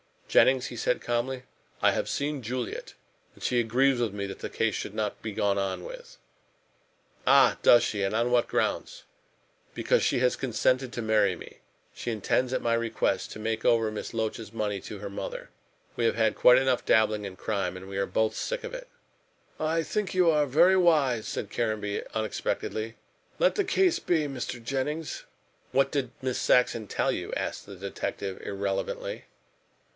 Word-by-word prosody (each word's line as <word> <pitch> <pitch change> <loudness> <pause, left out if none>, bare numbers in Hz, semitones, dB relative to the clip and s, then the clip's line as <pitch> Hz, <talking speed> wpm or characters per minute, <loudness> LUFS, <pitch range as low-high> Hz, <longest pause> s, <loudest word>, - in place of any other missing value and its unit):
"Jennings," 130 -1 +4
he 120 - -8
said 125 - 0
calmly, 125 +2 -2 0.4
"I - - +5
have - - -1
seen 145 -1 -2
Juliet, 125 +1 -4 0.4
and - - -14
she 125 - +2
agrees 125 +3 +2
with 115 -4 0
me 100 -1 -3
that 95 - -8
this - - -6
case - - +1
should - - -5
not 105 -2 -2
be 110 - -4
gone 100 0 +1
on 95 -2 -2
with." - - -10 1.1
"Ah! - - +6
does 120 -1 +7
she, 105 -3 -1
and 95 +2 0
on 120 +2 +1
what 120 -1 +3
grounds?" - - -1 0.7
"Because - - +2
she - - +2
has 125 0 +2
consented 130 +1 +1
to 120 - -3
marry 105 -4 +3
me. - - -12 0.4
She 120 - -4
intends, 120 +4 0
at - - 0
my 115 - +1
request, 115 -1 0
to - - -9
make 110 0 -2
over 115 -2 +3
Miss 110 - -6
Loach's 110 -1 -3
money 105 -3 -2
to 100 +2 -8
her 100 0 -6
mother. 100 - -6 0.5
We 115 - +1
have 115 - +2
had 110 -1 +2
quite 125 0 +6
enough 130 -1 +1
dabbling 110 -1 +3
in 95 -2 -7
crime, 95 -3 -2
and 95 +1 -9
we 100 - -5
are 100 - 0
both 110 0 +1
sick - - -3
of - - -6
it." - - -7 0.7
"I 160 +1 +1
think 210 +3 -2
you 180 -3 +4
are 150 -2 +2
very 170 +8 +5
wise," 145 -10 +3
said 105 - -4
Caranby 110 -3 -1
unexpectedly, 110 0 -2 0.4
"let - - +3
the 405 - +1
case 370 -1 +3
be, 160 -4 +1
Mr. 125 -3 -5
Jennings." 145 +5 -3 0.5
"What 135 +1 +3
did 135 -4 -1
Miss 130 -1 -1
Saxon 115 -3 +3
tell - - 0
you?" - - -4
asked - - -3
the 100 - -9
detective 95 0 -5
irrelevantly. 100 - -3
120 Hz, 180 wpm, -28 LUFS, 105-135 Hz, 1.1 s, does